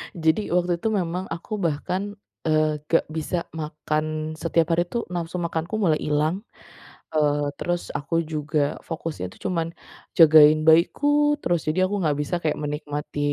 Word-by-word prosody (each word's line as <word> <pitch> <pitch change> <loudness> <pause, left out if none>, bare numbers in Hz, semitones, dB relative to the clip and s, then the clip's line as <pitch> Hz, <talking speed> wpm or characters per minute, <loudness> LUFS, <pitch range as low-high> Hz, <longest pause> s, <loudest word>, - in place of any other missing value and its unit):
Jadi 160 +4 +2
waktu 180 0 +2
itu 225 - +1
memang 185 -3 -1
aku 170 +6 -6
bahkan, 185 +6 -2 0.3
eee, 155 -1 +2
gak 165 - +3
bisa 160 +2 -2
makan. 155 0 -3
Setiap 165 0 +2
hari 175 +1 +3
itu 235 -1 -2
nafsu 175 0 -3
makanku 170 +3 -2
mulai 165 -8 +2
hilang, 150 +5 0 0.7
eee, 145 -1 +2
terus 175 0 -2
aku 150 +3 -1
juga 155 -1 -2 0.2
fokusnya 165 - -5
itu - - -6
cuman 165 -3 -1 0.5
jagain 155 -1 +8
bayiku 290 - +4
terus. 175 -1 +1
Jadi 155 +4 +1
aku 205 - -2
enggak 150 -3 +1
bisa 150 +5 -2
kayak 155 - 0
menikmati, 150 0 -4
160 Hz, 150 wpm, -24 LUFS, 155-175 Hz, 0.7 s, jagain